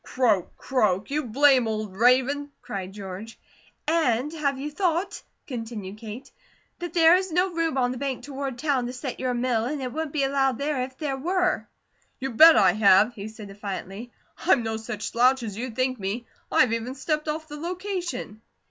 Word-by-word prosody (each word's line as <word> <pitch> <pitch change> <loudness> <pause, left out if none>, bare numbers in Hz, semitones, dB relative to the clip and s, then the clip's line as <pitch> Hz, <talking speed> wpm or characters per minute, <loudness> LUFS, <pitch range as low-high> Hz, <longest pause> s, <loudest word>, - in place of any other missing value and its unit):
"Croak! 220 -8 0
Croak! 215 -5 0
You 300 0 -1
blame 260 0 +4
old 215 -3 -3
raven," 260 +6 +3
cried 190 -2 -5
George. 200 +2 -8 0.5
"And 300 -3 +1
have 285 -4 -1
you 290 +3 -5
thought," 365 +3 -1 0.2
continued 225 -6 -6
Kate, 225 +3 -9 0.5
"that 350 -2 -5
there 335 +1 +7
is 375 -1 -3
no 360 +2 +1
room 330 -4 0
on 250 -1 +2
the 250 - -5
bank 270 -2 -3
toward 275 -3 -5
town 265 -3 0
to 250 - -5
set 255 0 -5
your 255 -1 -1
mill, 240 -2 0
and 290 +4 -3
it 255 -2 -4
wouldn't 315 -1 -3
be 285 -2 0
allowed 270 -2 +1
there, 285 -2 -1
if 260 +1 -5
there 280 -3 -2
were?" 365 +5 0 0.5
"You 265 0 -4
bet 320 +8 +9
I - - +6
have!" 210 +2 +5
he 205 -2 -7
said 215 -2 -10
defiantly. 200 +3 -6 0.3
"I'm 245 - +3
no 225 0 -2
such 220 -1 -6
slouch 250 +2 +3
as 210 -4 -5
you 245 +4 -4
think 255 +1 -1
me. 205 +5 -3 0.3
I've 245 -3 +4
even 230 +3 -3
stepped 300 +3 -2
off 310 +1 -3
the 295 -1 -8
location!" 350 - -4
255 Hz, 185 wpm, -25 LUFS, 225-300 Hz, 0.5 s, bet